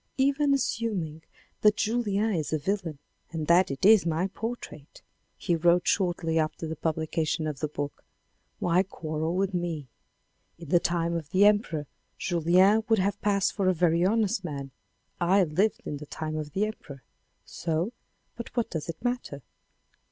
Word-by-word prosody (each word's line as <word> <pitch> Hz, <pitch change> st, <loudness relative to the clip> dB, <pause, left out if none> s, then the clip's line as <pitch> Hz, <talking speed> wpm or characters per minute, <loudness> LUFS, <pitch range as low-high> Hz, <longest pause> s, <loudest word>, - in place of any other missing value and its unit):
" -, -, -40 dB
Even 285 Hz, 0 st, +1 dB
assuming 205 Hz, -, -1 dB, 0.4 s
that 210 Hz, 0 st, +5 dB
Julien 220 Hz, -1 st, 0 dB
is 155 Hz, -5 st, -2 dB
a 155 Hz, -, +2 dB
villain 170 Hz, -1 st, -2 dB, 0.3 s
and 160 Hz, -2 st, -4 dB
that 175 Hz, +3 st, +4 dB
it 135 Hz, +5 st, -2 dB
is 215 Hz, -2 st, +7 dB
my 165 Hz, +1 st, 0 dB
portrait," 200 Hz, -9 st, -7 dB, 0.3 s
he 175 Hz, -, 0 dB
wrote 175 Hz, +2 st, +3 dB
shortly 175 Hz, -4 st, +1 dB
after 155 Hz, +1 st, -2 dB
the 160 Hz, 0 st, -4 dB
publication 160 Hz, 0 st, -1 dB
of 150 Hz, -3 st, -4 dB
the 155 Hz, -, -1 dB
book, 145 Hz, -1 st, -5 dB, 0.3 s
" -, -, -45 dB
why 175 Hz, +1 st, +3 dB
quarrel 160 Hz, -3 st, -3 dB
with 195 Hz, +1 st, 0 dB
me. 170 Hz, -6 st, -3 dB, 0.7 s
In 165 Hz, -3 st, -11 dB
the 175 Hz, -, +5 dB
time 170 Hz, 0 st, 0 dB
of 165 Hz, -3 st, -4 dB
the 190 Hz, +3 st, +4 dB
Emperor, 205 Hz, -8 st, +2 dB, 0.3 s
Julien 185 Hz, +5 st, +3 dB
would 225 Hz, -, +5 dB
have 200 Hz, +1 st, 0 dB
passed 200 Hz, -2 st, +1 dB
for 195 Hz, -2 st, 0 dB
a 185 Hz, -, +3 dB
very 170 Hz, 0 st, +2 dB
honest 200 Hz, -1 st, +1 dB
man. 140 Hz, -5 st, -5 dB, 0.5 s
I 185 Hz, +3 st, +4 dB
lived 185 Hz, +7 st, 0 dB
in 145 Hz, -, -4 dB
the 150 Hz, +1 st, -10 dB
time 155 Hz, +1 st, -4 dB
of 150 Hz, -2 st, -5 dB
the 200 Hz, +2 st, +1 dB
Emperor. 140 Hz, -, -8 dB, 0.4 s
So 170 Hz, +7 st, -2 dB, 0.2 s
— -, -, -45 dB
but 235 Hz, +1 st, -9 dB
what 235 Hz, -, 0 dB
does 160 Hz, -1 st, -4 dB
it 165 Hz, -, -4 dB
matter 245 Hz, -, -3 dB
175 Hz, 175 wpm, -27 LUFS, 155-200 Hz, 0.7 s, is